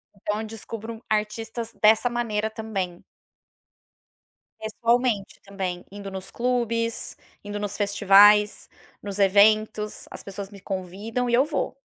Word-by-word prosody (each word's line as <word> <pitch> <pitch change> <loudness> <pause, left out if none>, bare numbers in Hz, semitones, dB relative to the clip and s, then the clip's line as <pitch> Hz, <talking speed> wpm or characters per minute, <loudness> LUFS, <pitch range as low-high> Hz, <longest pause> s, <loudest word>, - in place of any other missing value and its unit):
Então, 210 +2 -3
eu 220 - -5
descubro 225 +1 -7
artistas 225 +2 -2
dessa 220 +3 +5
maneira 220 -3 -1
também. 195 -6 -4 1.6
Pessoalmente 230 -1 0
também, 190 -3 -4
indo 200 0 -7
nos 190 0 -7
clubes, 235 -2 -1 0.3
indo 205 0 -5
nos 205 -1 -3
festivais, 205 +1 +5 0.4
nos 200 0 -5
eventos. 210 +2 +3
As - - -9
pessoas 195 0 -7
me 200 -1 -12
convidam 200 +7 -3
e 235 - 0
eu 265 +4 +4
vou. 300 -1 -2
210 Hz, 120 wpm, -25 LUFS, 200-230 Hz, 1.6 s, dessa